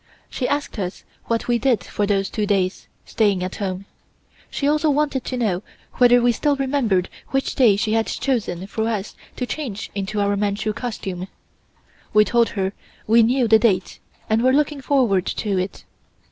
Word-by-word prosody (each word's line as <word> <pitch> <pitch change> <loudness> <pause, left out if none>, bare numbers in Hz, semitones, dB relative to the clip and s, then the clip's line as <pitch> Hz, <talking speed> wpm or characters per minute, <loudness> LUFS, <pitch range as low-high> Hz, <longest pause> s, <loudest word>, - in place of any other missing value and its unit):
She 250 - -2
asked 290 -5 -2
us 185 -1 -4 0.2
what 230 -1 -1
we 240 -1 +2
did 255 -4 +2
for 205 - -2
those 195 -1 0
two 210 -2 -1
days, 190 -2 0 0.2
staying 200 -5 +1
at 185 - -5
home. 195 -2 -4 0.6
She 280 - -2
also 305 +1 +2
wanted 285 -3 +1
to 255 - -3
know 200 -7 0 0.4
whether 245 -1 +7
we 245 - +5
still 285 +5 +1
remembered 260 -9 +1 0.2
which 270 0 -1
day 235 -7 +5
she 215 +2 0
had 225 0 +1
chosen 210 -9 -2
for 220 +3 -2
us 210 -3 -3 0.2
to 250 - -2
change 245 -7 -5
into 200 +1 -3
our 200 0 +1
Manchu 205 +1 -1
costume. 195 -6 -5 0.9
We 210 0 +7
told 235 0 +2
her 190 0 0 0.3
we 230 +2 +5
knew 245 +2 +3
the 220 0 +6
date, 195 -5 +1 0.3
and 220 +1 +2
were 255 +1 +3
looking 295 0 +1
forward 245 -10 +2
to 200 -3 -1
it. 185 +2 -4
220 Hz, 175 wpm, -22 LUFS, 200-255 Hz, 0.9 s, whether